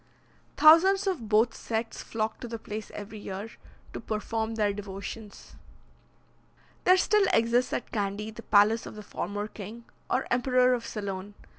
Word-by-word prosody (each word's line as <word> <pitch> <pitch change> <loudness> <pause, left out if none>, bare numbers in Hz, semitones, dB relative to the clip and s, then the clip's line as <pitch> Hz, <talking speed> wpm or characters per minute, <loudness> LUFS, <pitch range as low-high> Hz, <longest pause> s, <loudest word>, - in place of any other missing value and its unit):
Thousands 355 +6 +7
of 315 - -2
both 220 +2 +4
sects 225 0 -4
flock 220 -1 -3
to 245 - -6
the 230 0 -5
place 215 -1 -7
every 210 +1 -7
year, 200 +2 -6 0.4
to - - -5
perform 220 +1 -3
their 210 -2 +1
devotions. 200 +1 -8 1.3
There 370 +1 +7
still 415 +1 +3
exists 235 +2 +2
at - - -3
Candy 205 0 -2
the 220 - -10
palace 215 +1 +4
of - - -9
the 210 - -8
former 205 +1 -4
king, 215 +3 -9 0.3
or 255 - +1
emperor 250 0 +3
of 235 -2 -2
Ceylon. 200 -1 -5
220 Hz, 150 wpm, -28 LUFS, 205-245 Hz, 1.3 s, Thousands